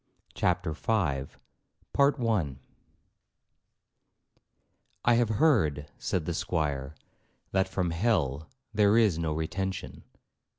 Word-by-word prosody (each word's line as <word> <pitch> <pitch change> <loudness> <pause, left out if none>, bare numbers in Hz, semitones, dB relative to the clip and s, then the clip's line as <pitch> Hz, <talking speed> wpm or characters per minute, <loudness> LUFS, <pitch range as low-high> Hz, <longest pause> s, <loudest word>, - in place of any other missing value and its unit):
CHAPTER 90 -2 0
V 75 - -3 0.4
'I 115 - -1 2.5
have 120 -1 +4
heard,' 95 - +2
said 85 -4 -1
the 85 - -2
Squire, 75 -4 -2 0.6
'that 95 0 +1
from 90 -2 -1
hell 80 - 0 0.2
there 105 0 +4
is 105 -8 +3
no 80 -2 -1
retention.' 90 +4 -3
90 Hz, 85 wpm, -29 LUFS, 80-110 Hz, 2.5 s, have